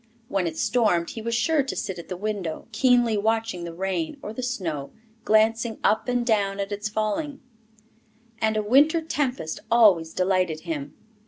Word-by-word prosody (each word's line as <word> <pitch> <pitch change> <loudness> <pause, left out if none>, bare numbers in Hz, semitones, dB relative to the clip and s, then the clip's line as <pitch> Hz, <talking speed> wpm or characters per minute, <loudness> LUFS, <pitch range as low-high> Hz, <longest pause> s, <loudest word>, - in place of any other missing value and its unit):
When 195 -3 0
it 160 -1 -5
stormed, 210 -9 +1
he 225 - -7
was 230 +1 -2
sure 310 +5 +2
to 270 - -4
sit 190 -2 -4
at 170 - -9
the 185 - -4
window, 195 -5 -3
keenly 240 -1 +3
watching 220 -4 -1
the 170 - -5
rain 185 - -2
or 210 - -5
the 255 - -5
snow, 170 - -3 0.4
glancing 225 +1 +2
up 220 +3 +2
and 245 -1 0
down 200 -4 +1
at 200 +1 -3
its 205 +1 -3
falling; 220 +8 -2 1.0
and 220 0 +1
a 215 - 0
winter 290 +9 +4
tempest 265 - -2
always 200 -9 +5
delighted 185 -3 0
him. 150 -4 -5
215 Hz, 170 wpm, -25 LUFS, 180-235 Hz, 1.0 s, always